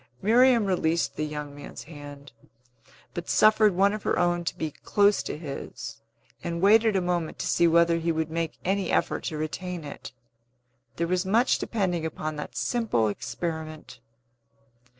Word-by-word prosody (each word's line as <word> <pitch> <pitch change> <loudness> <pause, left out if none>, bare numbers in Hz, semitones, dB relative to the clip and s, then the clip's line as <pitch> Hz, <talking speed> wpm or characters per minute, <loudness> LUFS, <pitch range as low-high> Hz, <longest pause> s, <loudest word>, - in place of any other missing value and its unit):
Miriam 235 - +5
released 170 -3 0
the 155 - -2
young 150 -1 -6
man's 145 - -9
hand, 145 -3 -11 0.8
but 175 0 -6
suffered 215 -2 +5
one 200 +2 +4
of 215 - -4
her - - 0
own 175 0 +1
to - - -2
lie 155 -2 -3
close 205 0 +3
to - - -5
his, 145 -4 -7 0.4
and 170 0 -3
waited 215 +3 +5
a 190 - +2
moment 175 -2 -2
to - - -4
see 170 - +3
whether 170 0 +4
he 165 0 0
would 160 -1 -2
make 165 -1 -2
any 195 +1 0
effort - - 0
to 155 - -3
retain 170 +3 -4
it. 145 - -8 0.8
There 170 - 0
was 180 +1 0
much 225 +6 +2
depending 185 -7 -1
upon 155 -1 -4
that 150 - -7
simple 215 - +1
experiment. 155 - -5
170 Hz, 160 wpm, -26 LUFS, 155-195 Hz, 0.8 s, Miriam